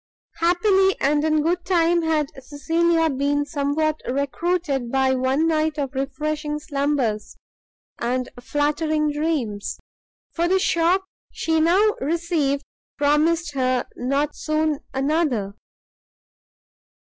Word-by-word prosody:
Happily 380 +3 +3
and 295 +2 +2
in 310 -1 +2
good 345 +2 0
time 345 -2 +2
had 310 -3 0
Cecilia 325 +4 +1
been 285 0 0
somewhat 295 +1 -1
recruited 280 -1 -1
by 265 -1 +2
one 260 +5 +1
night 315 -1 +1
of 280 -2 -3
refreshing 295 +3 -2
slumbers 280 -7 -2 0.6
and 250 +1 -1
flattering 300 +3 0
dreams, 290 -10 -2 0.6
for 340 0 0
the 380 +2 +3
shock 360 +1 +2 0.3
she 320 -1 0
now 390 +6 +4
received 315 -4 0 0.3
promised 300 +2 +2
her 255 -2 0
not 280 +4 -1
soon 310 -1 0
another. 270 -7 0
300 Hz, 105 wpm, -23 LUFS, 275-330 Hz, 0.6 s, now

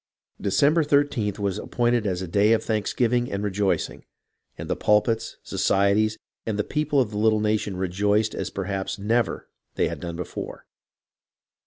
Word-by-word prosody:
December 145 - +3
13th 140 -8 +1
was 100 -3 -1
appointed 120 -2 0
as 90 -1 -1
a - - -5
day 100 +5 +4
of 115 - +1
thanksgiving 120 +3 0
and 100 +1 -2
rejoicing, 100 -1 -1 0.5
and - - -6
the - - 0
pulpits, 110 +2 +1
societies, 100 +2 +2 0.3
and 110 -2 -2
the 105 - +1
people 150 +1 0
of 120 -5 +1
the 105 - -3
little 110 0 +3
nation 105 -2 0
rejoiced 100 +4 +1
as - - -3
perhaps 95 0 -3
never 115 +3 0 0.3
they - - +1
had - - -6
done 85 -1 -5
before. 90 0 -6
105 Hz, 155 wpm, -25 LUFS, 100-115 Hz, 0.5 s, day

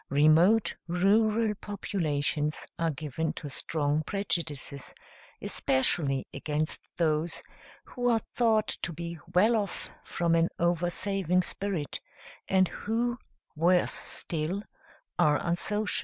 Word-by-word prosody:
Remote 160 +9 +4
rural 210 +5 +3
populations 155 -8 -2
are 165 0 +2
given 155 +1 -3
to 145 - -7
strong 150 0 0
prejudices, 155 -7 -3 0.5
especially 135 0 +2
against 150 +2 -3
those 160 0 +1 0.4
who 245 -1 -1
are 230 - +4 0.2
thought 220 -3 +3
to 175 - -2
be 170 0 -6 0.2
well 215 +6 +5
off 205 -4 -3
from 170 -1 0
an 165 0 +3
oversaving 175 +1 +1
spirit; 185 -5 -3 0.5
and 190 -1 +4
who, 235 +3 -2 0.4
worse 175 +3 +3
still, 170 +5 -3 0.6
are 150 -1 +5
unsocial. 200 +4 0
170 Hz, 105 wpm, -29 LUFS, 155-200 Hz, 0.6 s, well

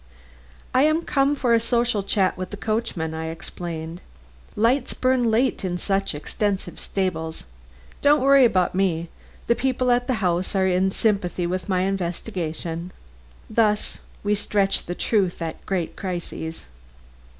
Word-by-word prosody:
"I 255 - +5
am 310 +3 +3
come 280 -1 +2
for 250 -4 +2
a 230 - +5
social 235 -2 +1
chat 195 -1 +1
with 185 0 -5
the 205 - -7
coachman," 215 -8 -2
I 160 0 -4
explained. 165 +1 -6 0.5
"Lights 240 +4 +2
burn 255 -2 +2
late 240 +2 +1
in 180 -2 -1
such 195 -2 0
extensive 195 +6 -2
stables. 160 -5 -2 0.6
Don't 295 +1 +5
worry 275 0 +7
about 190 -7 +3
me. 175 -3 0 0.4
The - - +4
people 255 0 +1
at 245 0 +2
the 255 - +1
house 185 -2 0
are 190 -1 +3
in 185 +1 +2
sympathy 190 -4 0
with 180 +2 -3
my 185 -1 +2
investigation." 175 -2 -3 0.6
Thus 215 -2 +1 0.2
we 205 0 +2
stretch 200 -1 +1
the 175 - -3
truth 195 -5 +1
at 165 -2 -5
great 180 -4 -1
crises. 175 -3 -5
195 Hz, 145 wpm, -24 LUFS, 175-230 Hz, 0.6 s, worry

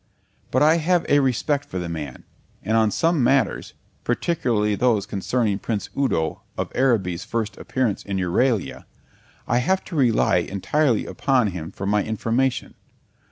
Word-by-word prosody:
But - - +2
I 155 +2 +5
have 175 +1 +1
a 145 - +4
respect 140 +2 0
for 95 - -6
the 90 -1 -3
man; 75 -6 -6 0.4
and 110 +3 0
on 110 -1 +4
some 165 - +1
matters, 135 0 +1 0.3
particularly 120 -6 0
those 110 -1 +1
concerning 105 +1 -1
Prince 105 -2 -3
Udo 80 - 0 0.2
of - - -3
Araby's 105 -10 +1
first 110 -3 -3
appearance 125 -6 -1
in 100 -1 -3
Euralia, 95 - 0 0.6
I 120 - +2
have 190 +9 +1
to 175 - -8
rely 125 -6 +3
entirely 120 +6 0
upon 130 -6 +1
him 85 -4 -6
for 95 - -7
my 105 +1 +2
information. 115 +4 -1
115 Hz, 150 wpm, -23 LUFS, 100-135 Hz, 0.6 s, I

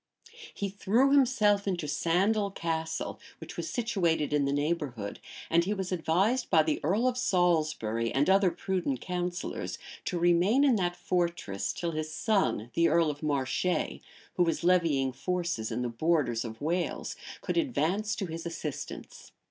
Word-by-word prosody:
He 200 - -3
threw 220 +7 +2
himself 220 -8 +3
into 175 -5 -1
Sandal 195 +7 +1
Castle, 165 -3 -3 0.2
which - - -10
was - - -4
situated 175 - 0
in 145 -1 +2
the 140 - 0
neighborhood; 145 - -2 0.3
and 170 +1 +3
he 205 +4 -1
was 190 -2 -4
advised 185 +8 +1
by 160 -3 +5
the 155 -1 0
earl 205 - +2
of 250 0 0
Salisbury, 155 - +1
and 140 +2 +2
other 190 0 +5
prudent 170 -6 -2
counsellors, 180 +2 -3 0.3
to 180 - -1
remain 175 +9 +4
in 270 -4 +5
that 175 -2 0
fortress 170 - -1
till 170 -1 -3
his 155 0 -4
son, 190 - 0
the 170 +4 +3
earl 165 -2 +3
of 145 - -10
Marche, 140 -4 0 0.7
who 180 - +3
was 165 0 -1
levying 165 -7 +3
forces 170 -5 -2
in 125 - -2
the - - -1
borders 120 -2 +1
of 110 -1 -8
Wales, 170 +4 -2 0.3
could - - -2
advance 215 - 0
to 195 - -3
his 165 -1 -6
assistance. 155 -4 -7
170 Hz, 155 wpm, -29 LUFS, 150-195 Hz, 0.7 s, by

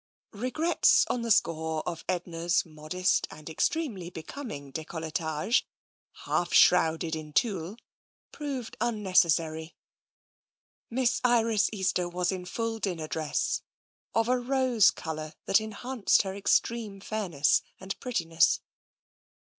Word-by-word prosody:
Regrets 255 +10 +3
on 245 - -1
the 230 - -3
score 160 -5 +1
of 170 -2 -4
Edna's 175 -1 0
modest 155 +4 -1
and 155 - -12
ex 160 - +1
tremely 220 - -4
becoming 160 - -7
decolletage, 160 +4 -1 0.6
half 175 - 0
shrouded 165 -2 +4
in 155 -1 -8
tulle, 195 - 0 0.5
proved 275 -5 -5
unnecessary. 170 -8 +1 1.1
Miss 250 +1 +1
Iris 230 -3 +3
Easter 185 -3 0
was 180 +1 0
in 185 -1 -5
full 225 +4 -3
dinner 175 -6 -3
dress, 155 -1 -1 0.5
of 225 0 +2
a 250 0 +2
rose 250 -4 +3
colour 155 -1 -5
that 195 - +4
enhanced 220 +1 +1
her 190 -1 -4
extreme 205 +1 0
fairness 190 -9 +1 0.2
and 190 +1 -5
prettiness. 165 -9 +2
185 Hz, 115 wpm, -28 LUFS, 160-230 Hz, 1.1 s, shrouded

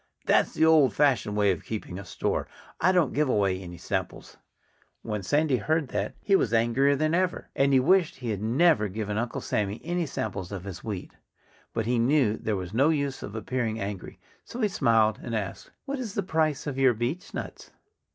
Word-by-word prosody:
"That's - - +3
the 160 - +4
old 150 -9 +5
fashioned 130 -8 +2
way 100 -1 +4
of 90 - -4
keeping 100 -4 -5
a 100 - -9
store. - - -2 0.3
I 185 - +4
don't 175 -8 +2
give 150 -1 +1
away 100 -5 +1
any 90 -2 -9
samples." - - -4 0.7
When 105 -2 -3
Sandy 145 +6 +2
heard 155 +4 0
that - - -3
he 200 - +3
was 115 - +2
angrier 120 +5 +3
than 155 +3 0
ever. 180 +1 0
And 140 0 +3
he 135 - +5
wished 180 +5 +3
he 125 -4 -4
had 100 -2 -3
never 125 +1 +3
given 105 +1 -3
Uncle 120 +1 -3
Sammy 105 +1 -2
any 175 0 -1
samples 100 -7 -4
of 95 -3 -5
his 95 -2 -8
wheat. 100 -5 -5 0.6
But 115 -2 -2
he 120 +1 +1
knew 125 -3 +3
there 110 -1 -2
was 95 0 -5
no 135 +7 +4
use 140 -4 -1
of 100 - -7
appearing 115 -1 -2
angry. 100 -2 -6 0.2
So 240 - -9
he 210 - +2
smiled 115 - +2
and 115 - -4
asked: 100 -3 -4 0.2
"What 280 -1 -3
is 225 -6 -5
the 200 - 0
price 160 -5 0
of 140 -3 -3
your 130 -3 +4
beechnuts?" 120 +10 -5
120 Hz, 200 wpm, -27 LUFS, 105-155 Hz, 0.7 s, old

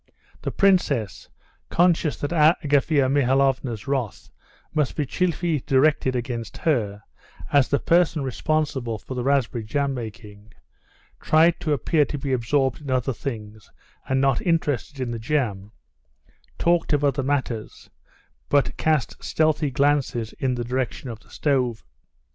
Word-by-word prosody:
The - - -2
princess, 150 - +1 0.4
conscious 170 -3 +2
that 145 - -2
Agafea 150 -3 +3
Mihalovna's 135 -4 +1
wrath 130 -7 -3 0.4
must 150 -3 0
be 150 - -1
chiefly 170 0 0
directed 135 -1 +3
against 120 -2 -4
her, 105 -10 -1 0.5
as 140 -3 +5
the 140 - +2
person 165 -1 +2
responsible 135 -3 -1
for 130 - -8
the 125 -1 -3
raspberry 130 -4 +1
jam 140 +5 -1
making, 105 -3 -9 0.7
tried 160 +2 +3
to 155 - -2
appear 150 +3 +2
to 145 - -5
be 135 -1 -2
absorbed 130 +3 0
in 145 - -8
other 130 0 0
things 110 -4 -7 0.4
and 130 0 +2
not 135 -2 +2
interested 150 -5 -1
in 125 -2 -2
the 115 - -4
jam, 110 -6 -2 0.9
talked 170 -2 +1
of 145 0 +1
other 140 -1 +2
matters, 130 -5 -3 0.6
but 145 - +2
cast 155 -5 0
stealthy 155 -1 +1
glances 135 -4 0
in 130 -2 0
the 120 - -3
direction 125 +1 -3
of 110 - -9
the - - -24
stove. 125 -6 0
135 Hz, 135 wpm, -24 LUFS, 120-150 Hz, 0.9 s, as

